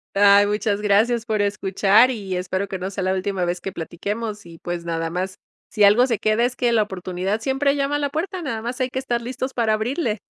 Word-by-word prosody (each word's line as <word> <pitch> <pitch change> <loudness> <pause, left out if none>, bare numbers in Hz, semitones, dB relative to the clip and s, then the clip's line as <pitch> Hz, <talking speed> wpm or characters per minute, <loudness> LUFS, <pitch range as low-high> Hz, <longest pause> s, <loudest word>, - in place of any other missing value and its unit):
Ay, 200 0 +6
muchas 210 0 0
gracias 220 +3 +2
por 215 -3 0
escuchar 205 +3 +3
y 195 -6 -4
espero 185 +2 -2
que 190 - -4
no 185 +2 -4
sea 195 -1 -3
la 185 0 +1
última 190 -1 -1
vez 175 0 -2
que 195 - -4
platiquemos 205 +5 -5
y 165 -1 -13
pues 175 -1 -5
nada 165 -1 -2
más. 185 +3 -4 0.3
Si 210 - +1
algo 210 +5 +6
se 235 -5 -1
queda 215 +2 +2
es 250 +1 -2
que 240 -1 +1
la 220 -2 +4
oportunidad 190 +1 -3
siempre 275 +3 +1
llama 280 0 0
a 290 - 0
la 285 -1 -1
puerta, 355 +4 -3
nada 230 -7 -3
más 240 +3 -5
hay 255 -1 -1
que 260 - -2
estar 240 -3 -2
listos 260 +2 -4
para 225 -3 +2
abrirle. 225 0 -1
210 Hz, 230 wpm, -22 LUFS, 190-245 Hz, 0.3 s, Ay